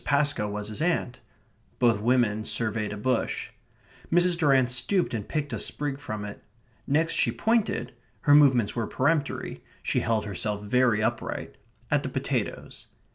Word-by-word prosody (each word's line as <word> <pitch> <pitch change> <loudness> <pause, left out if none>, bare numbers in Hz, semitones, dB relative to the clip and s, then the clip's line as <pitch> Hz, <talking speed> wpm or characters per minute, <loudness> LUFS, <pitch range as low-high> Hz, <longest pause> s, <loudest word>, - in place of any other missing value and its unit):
Pascoe 140 -7 +1
was 105 0 -4
his 110 +7 -6
aunt. 160 -7 0 0.6
Both 115 -4 +3
women 115 -2 +2
surveyed 110 -2 -1
a 105 - -5
bush. 125 +3 -1 0.6
Mrs. 175 +1 +4
Durrant 135 -6 +3
stooped 150 +9 +1
and 105 -3 -3
picked 145 -2 -2
a - - -2
sprig 145 -2 -1
from 110 -7 -5
it. 105 - -9 0.4
Next 160 +4 +2
she - - +2
pointed 220 - 0 0.3
(her 145 - +4
movements 130 -8 +5
were 115 -3 -1
peremptory; 145 +2 -1 0.2
she - - +1
held 110 -2 0
herself 105 +1 -3
very 115 0 +2
upright) 120 +2 -3 0.4
at - - +3
the - - -4
potatoes. - - -3
125 Hz, 150 wpm, -27 LUFS, 110-145 Hz, 0.6 s, movements